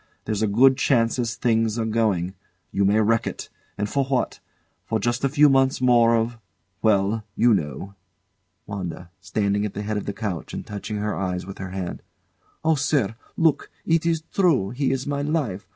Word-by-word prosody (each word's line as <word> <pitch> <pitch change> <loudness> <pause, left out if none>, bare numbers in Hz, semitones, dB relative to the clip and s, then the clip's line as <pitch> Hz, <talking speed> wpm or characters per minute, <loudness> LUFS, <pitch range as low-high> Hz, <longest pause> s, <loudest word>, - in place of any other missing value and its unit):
There's 105 -1 -2
a 110 - +2
good 130 +6 +5
chance 115 -2 +2
as 115 -1 -1
things 115 -2 +1
are 115 - 0
going. 105 -5 0 0.4
You 100 - +1
may 105 +2 +3
wreck 115 +1 +2
it. - - -6 0.3
And 105 - -1
for 140 +6 0
what? 130 -2 -1 0.6
Just 120 +4 -1
a 135 - +3
few 150 +2 +5
months 135 -1 +3
more 120 -2 +5
of 115 +1 -1 0.4
well 105 0 +2
you 120 -1 +4
know. 75 +2 -3 0.7
WANDA. 90 -3 -6
[Standing 100 +1 0
at 105 - -4
the 105 - -3
head 105 0 -2
of 105 - -4
the - - 0
couch 100 -8 -4
and - - -6
touching 105 0 -5
her 105 +1 -2
eyes 90 -2 -2
with 95 +1 -9
her 95 -1 -5
hands] 95 -1 -5 0.6
Oh, 160 - +5
sir! 140 -7 +1 0.2
Look! 160 -3 +2 0.2
It 165 0 +2
is 165 -1 0
true. 155 - +2
He 135 +2 0
is 135 0 -2
my 145 -1 -2
life. 140 - -2
110 Hz, 185 wpm, -24 LUFS, 100-130 Hz, 0.7 s, good